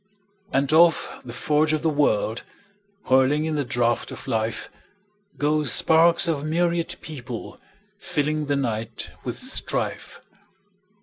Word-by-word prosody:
And 140 +3 +1
off 165 0 +3
the 120 - -8
forge 150 +5 +1
of 155 0 -1
the - - +2
world, 120 -6 +1 0.6
Whirling 135 +4 +3
in 160 - -2
the 145 -1 0
draught 120 -2 0
of - - -10
life, 110 0 -2 0.7
Go 150 +1 +1
sparks 165 +6 +4
of 150 -4 -1
myriad 170 +2 0
people, 130 -6 -8 0.4
fillingThe 150 -1 -1
night 115 -3 -4
with - - -4
strife. - - -2
145 Hz, 120 wpm, -24 LUFS, 125-155 Hz, 0.7 s, sparks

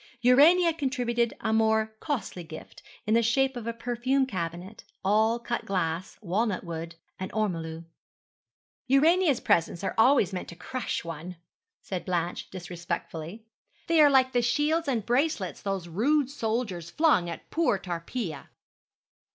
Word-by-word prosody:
Urania 320 +8 +6
contributed 245 -6 -1
a 220 - 0
more 220 0 +2
costly 250 - -3
gift, 155 -1 -11 0.2
in 215 - +1
the 230 - +5
shape 265 +4 +2
of 235 -2 -6
a - - 0
perfume 245 +3 0
cabinet, 185 -1 -5 0.2
all 220 +3 +3
cut 240 0 -3
glass, 180 -2 -2
walnut 200 +2 0
wood, 165 -1 -6 0.2
and 185 - -5
ormolu. 165 -6 -2 1.0
'Urania's 310 +1 +4
presents 170 +2 +1
are - - -1
always 225 -5 +5
meant 185 - -4
to 170 - -9
crush 255 +8 -4
one,' 170 +2 -6 0.5
said 185 -2 -4
Blanche 175 -1 -2
disrespectfully; 175 +2 -6 0.4
'they 335 -2 +4
are 295 - +8
like 260 -2 +4
the 245 - +2
shields 295 +7 +1
and 235 -6 0
bracelets 245 - 0
those 195 -3 -3
rude 265 - +1
soldiers 220 - -2
flung 185 - +3
at 170 - -8
poor 320 -11 +2
Tarpeia.' 175 - -5
220 Hz, 140 wpm, -27 LUFS, 175-260 Hz, 1.0 s, are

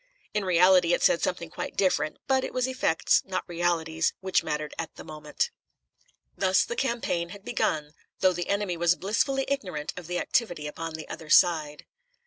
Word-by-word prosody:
In 210 -1 0
reality 180 -1 +5
it - - -4
said 170 - +4
something 170 -3 -2
quite - - -5
different, 185 -5 +1
but 265 -1 +2
it - - -5
was 255 -1 +1
effects, 255 -11 +2
not 190 -1 -4
realities, 165 -2 0
which 190 0 +1
mattered 150 0 -3
at 160 - -5
the - - -10
moment. 155 - -3 0.8
Thus 190 -1 +3
the 235 - -4
campaign 235 -10 -1
had 200 +2 -11
begun, 150 -10 -1 0.3
though 185 -1 +4
the 175 0 -4
enemy 200 -3 0
was 175 +1 +3
blissfully 265 +8 0
ignorant 185 - -3
of 180 -3 -8
the 180 0 -2
activity 175 -10 0
upon 160 +2 -5
the 160 - -7
other 160 - -8
side. 155 -4 +3
175 Hz, 175 wpm, -27 LUFS, 160-200 Hz, 0.8 s, reality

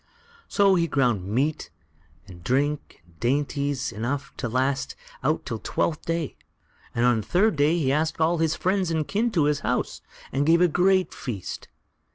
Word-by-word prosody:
So 200 -2 +4
he 170 -2 +2
ground 120 - +1
meat 140 +9 -1 0.6
and 90 -4 -13
drink 140 - -1
and 85 -2 -26
dainties 140 +1 0
enough 130 +6 -4
to 120 - -3
last 130 +3 0 0.3
out - - 0
till - - -4
Twelfth 160 -1 -2
Day, 165 -3 -2 0.6
and 120 - +2
on 120 -3 +3
the - - -13
third 205 +3 +3
day 150 +4 +3
he 135 -6 +1
asked 155 +3 0
all 165 +1 +2
his 160 -1 +1
friends 185 -1 0
and 160 -2 -1
kin 225 +4 +1
to 165 - +3
his 145 0 +2
house, - - -2 0.3
and 140 - +1
gave 165 +1 +5
a 180 - +5
great 185 +3 +2
feast. 110 -8 -6
145 Hz, 175 wpm, -25 LUFS, 125-170 Hz, 0.6 s, gave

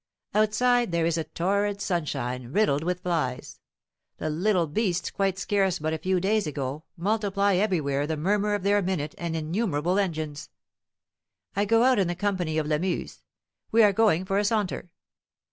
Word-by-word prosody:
Outside 235 +2 +2
there 170 -1 +1
is 165 -1 0
torrid 200 +3 0
sunshine, 130 -10 -2
riddled 160 -6 +2
with 180 +1 -2
flies. 160 -9 -2 0.6
The 155 - -2
little 180 +2 +2
beasts, 180 +2 -1
quite 195 -1 0
scarce 195 -2 +1
but 155 0 -2
a 160 - -2
few 185 +3 +1
days 205 0 +1
ago, 145 +1 -4
multiply 200 +1 +1
everywhere 150 -8 0
the 160 0 -2
murmur 205 +5 +1
of 205 - -4
their 205 +1 +3
minute 175 -6 -2
and 170 -1 -3
innumerable 170 +1 0
engines. 155 -6 -3 1.1
I 200 +1 +2
go 225 +3 +4
out 255 -3 +4
in 190 - +2
the 175 - -2
company 180 -5 -1
of 155 - 0
Lamuse; 155 +5 -2 0.5
we 225 0 +6
are 205 -1 +5
going 190 -4 +3
for 195 +1 +1
a - - +1
saunter. 205 -4 -1
185 Hz, 160 wpm, -26 LUFS, 155-205 Hz, 1.1 s, we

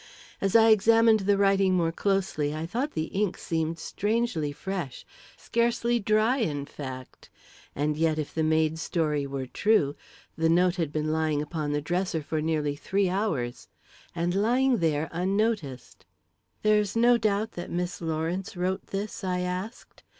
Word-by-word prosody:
As 195 +1 0
I 225 0 +7
examined 225 +1 +5
the 200 0 +2
writing 195 -1 +3
more 165 -2 +1
closely, 175 -6 -1
I 155 +1 -3
thought 250 - -2
the 155 - -1
ink 195 -2 0
seemed 160 0 -2
strangely 205 -4 -1
fresh 175 -2 -5 0.3
scarcely 235 0 0
dry, 215 +4 +2
in 150 - -1
fact; 130 -3 -9 0.5
and 150 +1 0
yet, 160 0 +1
if 155 -2 -4
the 160 - -1
maid's 160 0 +1
story 150 -5 -1
were 135 -1 -4
true, 150 - +2 0.4
the 160 0 +1
note 180 +2 +3
had 165 -4 -1
been 155 0 -1
lying 155 -2 0
upon 150 0 -3
the 145 0 0
dresser 175 +1 -1
for 155 +1 -2
nearly 150 -2 0
three 195 +5 0
hours. 165 - -2 0.5
And 175 +1 0
lying 245 +6 +2
there 155 -1 +1
unnoticed! 185 - -2 0.6
"There's 210 -1 +2
no 240 +1 +5
doubt 215 0 0
that 175 - -7
Miss 175 +1 -3
Lawrence 165 +4 -3
wrote 185 +2 -2
this?" 200 +1 -5
I 180 -1 -1
asked. 180 +5 -5
180 Hz, 155 wpm, -27 LUFS, 155-205 Hz, 0.6 s, I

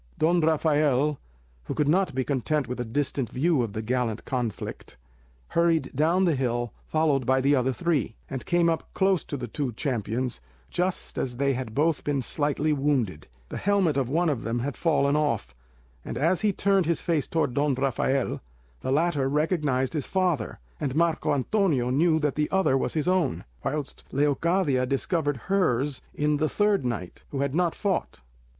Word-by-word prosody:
Don 170 +2 +3
Rafael, 150 -3 +2 0.5
who - - -4
could 150 -2 +1
not 185 0 +2
be 130 - +1
content 140 +1 -1
with 125 +1 -5
a - - 0
distant 130 +1 -1
view 150 +1 +1
of 115 -4 -3
the 110 +1 -4
gallant 120 -2 -1
conflict, 115 - -4 0.5
hurried 165 -5 +1
down 165 +7 +3
the 170 - +3
hill, 120 -4 -1
followed 155 -4 +2
by 130 0 +4
the 140 +2 +3
other 130 0 +1
three, 145 - -1
and 135 -2 -5
came 175 -1 +3
up 165 -1 -2
close 190 -2 +2
to 145 - -4
the 125 -2 -5
two 135 +2 -3
champions 120 - -2 0.3
just 180 +1 -1
as 125 -2 -3
they 140 +1 +2
had 125 -4 -5
both 155 +1 +1
been 140 -3 -1
slightly 150 +3 0
wounded. 130 - 0 0.2
The - - -5
helmet 195 -7 +2
of 135 -3 0
one 170 +5 +2
of 140 -7 0
them 115 +1 -1
had 130 +3 -2
fallen 145 -4 +2
off, 145 - 0 0.5
and - - -5
as 170 +4 +2
he 210 -1 +3
turned 195 -2 +2
his 170 - 0
face 160 -4 0
towards 160 -6 0
Don 145 0 +1
Rafael, 135 0 0 0.4
the 130 - -3
latter 145 -2 +2
recognised 150 -3 0
his 150 -4 -2
father, 180 - 0 0.2
and 135 -2 -2
Marco 165 0 +1
Antonio 145 - +1
knew 160 +4 +3
that 150 -2 +1
the 150 0 -1
other 190 -8 +2
was 135 - -1
his 155 0 0
own, 180 -7 +1 0.2
whilst 145 -1 -3
Leocadia 145 -1 +1
discovered 145 +1 0
hers 145 -9 +1
in 150 0 +1
the 155 +1 +1
third 205 -5 +2
knight 115 -8 -4
who 140 - -3
had 140 -1 -1
not 175 0 +1
fought. 195 - -2
145 Hz, 180 wpm, -26 LUFS, 130-165 Hz, 0.5 s, by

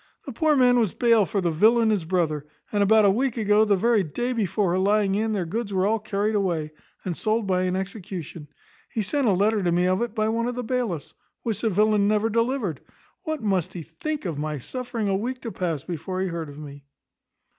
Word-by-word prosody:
The 275 - -6
poor 310 +4 +2
man 250 -2 +5
was 220 -6 0
bail 230 -5 +4
for 205 -3 -1
the 170 -2 0
villain 220 +7 +4
his 195 -6 0
brother; 160 -4 -1 0.2
and 205 - +1
about 215 +1 +5
a 200 - +6
week 250 +3 0
ago, 210 0 +3
the 205 -2 +3
very 225 +2 +3
day 240 +10 -2
before 200 -4 0
her 185 - +1
lying 200 0 +2
in, 220 +2 0
their 190 -4 -1
goods 210 +5 -3
were 190 -1 +1
all 220 +2 +1
carried 210 0 -1
away, 170 -7 -1 0.3
and 180 -3 -2
sold 220 +3 0
by 185 -1 +1
an 180 0 0
execution. 185 -5 -6 0.4
He 220 - -2
sent 275 +5 0
a - - +5
letter 205 +3 +2
to 175 -2 +1
me 175 +1 +2
of 185 +2 +1
it 235 -2 -3
by 215 -1 +1
one 230 +1 0
of 245 - -3
the 250 - -3
bailiffs, 220 - -2 0.3
which 225 -3 -2
the 225 - +1
villain 210 +1 +3
never 215 +1 +1
delivered. 230 - -1 0.4
What 315 -6 -3
must 190 -5 0
he 175 - -6
think 285 - -5
of 160 -5 -3
my 150 0 -2
suffering 235 - -4
a 195 - +1
week 250 +6 -3
to 230 - -4
pass 165 -8 -3
before 180 +2 -5
he 190 - -1
heard 165 -3 -5
of 145 - -11
me?" 145 -2 -10
205 Hz, 230 wpm, -24 LUFS, 180-230 Hz, 0.4 s, a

